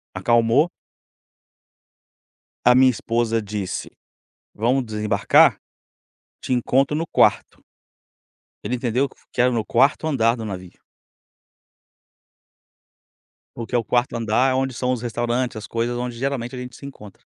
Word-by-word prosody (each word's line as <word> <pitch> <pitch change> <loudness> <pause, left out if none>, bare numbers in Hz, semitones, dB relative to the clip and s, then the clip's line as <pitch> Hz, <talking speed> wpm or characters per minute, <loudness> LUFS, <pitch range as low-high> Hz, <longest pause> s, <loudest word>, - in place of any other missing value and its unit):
acalmou. 120 +7 +3 2.0
A 125 - +7
minha 130 +1 +6
esposa 115 0 -1
disse: 100 -3 -5 0.6
"Vamos 125 +5 +1
desembarcar? 105 -1 +3 0.8
Te 130 - -5
encontro 135 +3 +1
no 165 +2 -2
quarto". - - +1 1.0
Ele 125 - -2
entendeu 125 +2 0 0.2
que 125 - 0
era 125 - +4
no 115 -3 -1
4º 135 +6 +2
andar 120 -6 +2
do 110 - -6
navio. 95 -3 -8 2.8
Porque 120 +1 -5
o 120 - +2
4º 120 +2 0
andar 115 +4 +1
é - - +1
onde 135 -1 -1
são 125 +2 -1
os 125 -2 -2
restaurantes, 120 +1 -2
as 105 - -8
coisas 115 +1 -2
onde 120 -1 -4
geralmente 130 -1 -3
a - - -6
gente 125 -2 -8
se 140 - -12
encontra. 105 -8 -13
120 Hz, 130 wpm, -22 LUFS, 115-130 Hz, 2.8 s, A